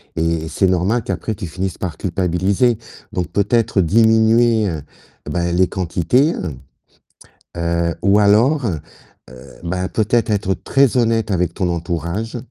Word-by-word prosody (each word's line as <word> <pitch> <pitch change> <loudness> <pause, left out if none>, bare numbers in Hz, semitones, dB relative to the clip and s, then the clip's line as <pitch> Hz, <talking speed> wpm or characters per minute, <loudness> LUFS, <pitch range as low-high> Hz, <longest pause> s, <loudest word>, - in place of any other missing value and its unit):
et 80 -1 -1
c'est 95 - +1
normal 95 +6 +1
qu'après 110 - -3
tu 100 -3 -6
finisses 95 +2 -4
par 85 -4 -4
culpabiliser, 95 +6 0 0.4
donc 90 -2 -2
peut-être 105 0 +1
diminuer, 110 +3 +3
heu, 80 -3 -4 0.5
ben, 85 0 -1
les 90 0 +3
quantités, 95 - +1
hem, 80 - -4 1.0
heu, 85 0 -1
ou 100 +1 +4
alors, 120 +7 +3
heu, 85 -8 -1 0.8
ben 90 +2 -2
peut-être 110 +1 +1
être 95 -2 0
très 135 - +2
honnête 115 -3 +1
avec 90 -1 0
ton 90 -3 -1
entourage 85 +7 -3
95 Hz, 135 wpm, -19 LUFS, 85-110 Hz, 1.0 s, ou